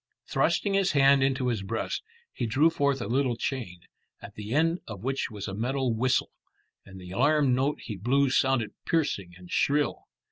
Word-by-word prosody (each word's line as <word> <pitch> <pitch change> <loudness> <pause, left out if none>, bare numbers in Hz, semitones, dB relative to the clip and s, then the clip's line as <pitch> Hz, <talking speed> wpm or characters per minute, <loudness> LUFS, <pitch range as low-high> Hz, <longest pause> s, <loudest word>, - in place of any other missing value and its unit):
Thrusting 200 - +1
his 195 -2 +2
hand 140 -1 +5
into 130 -1 +1
his 115 -4 -1
breast, 110 +4 -3 0.3
he 120 - -2
drew 145 +9 +3
forth 140 -5 0
a - - -5
little 130 0 +1
chain, 115 -11 -4 0.4
at - - -11
the 105 +1 -8
end 165 +5 +2
of 105 -3 -8
which 135 +1 -1
was 105 -3 -6
a 100 - -5
metal 125 +3 -1
whistle, 130 +3 +1 0.5
and 95 -1 -12
the 90 -1 -10
alarm 140 +4 +3
note 135 +4 0
he 105 - -6
blew 130 +7 +2
sounded 130 -5 +2 0.2
piercing 100 - 0
and 90 -1 -14
shrill. 145 0 +1
130 Hz, 180 wpm, -27 LUFS, 110-140 Hz, 0.5 s, hand